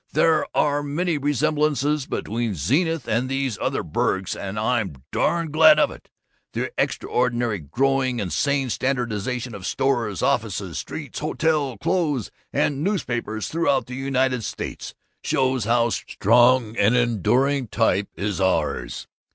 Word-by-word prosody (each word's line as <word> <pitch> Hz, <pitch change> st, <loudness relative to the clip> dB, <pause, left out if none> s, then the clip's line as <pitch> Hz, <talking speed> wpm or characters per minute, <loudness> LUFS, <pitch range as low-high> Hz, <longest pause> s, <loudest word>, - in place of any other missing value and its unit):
There 160 Hz, -2 st, +3 dB
are 145 Hz, 0 st, +2 dB
many 150 Hz, +3 st, -1 dB
resemblances 150 Hz, 0 st, +1 dB
between 115 Hz, -1 st, -2 dB
Zenith 150 Hz, -, 0 dB
and 120 Hz, +4 st, 0 dB
these 135 Hz, -6 st, -2 dB
other -, -, -1 dB
burgs, 95 Hz, -1 st, -1 dB
and 100 Hz, +1 st, -5 dB
I'm 105 Hz, -, -1 dB
darn 170 Hz, -3 st, 0 dB
glad 155 Hz, 0 st, +7 dB
of 155 Hz, -, +3 dB
it! -, -, -13 dB, 0.4 s
The -, -, -2 dB
extraordinary, 120 Hz, -4 st, 0 dB
growing, 130 Hz, -, 0 dB
and 90 Hz, -7 st, -3 dB
sane 140 Hz, -, +1 dB
standardization 125 Hz, -1 st, -2 dB
of 100 Hz, -3 st, -8 dB
stores, 120 Hz, -8 st, 0 dB
offices, -, -, -1 dB
streets, -, -, -6 dB
hotels, 150 Hz, -7 st, 0 dB
clothes, 150 Hz, -, 0 dB, 0.2 s
and 145 Hz, 0 st, 0 dB
newspapers 120 Hz, -, -2 dB
throughout 165 Hz, -4 st, +1 dB
the 125 Hz, -, -9 dB
United 130 Hz, -2 st, 0 dB
States -, -, -6 dB, 0.3 s
shows 130 Hz, -4 st, +1 dB
how 120 Hz, +1 st, +2 dB
strong 120 Hz, +2 st, +3 dB
and 110 Hz, +5 st, +4 dB
enduring 125 Hz, +4 st, +2 dB
a -, -, -16 dB
type 105 Hz, -2 st, +1 dB
is 100 Hz, +2 st, -2 dB
ours. 80 Hz, -9 st, -1 dB
125 Hz, 135 wpm, -23 LUFS, 110-145 Hz, 0.4 s, glad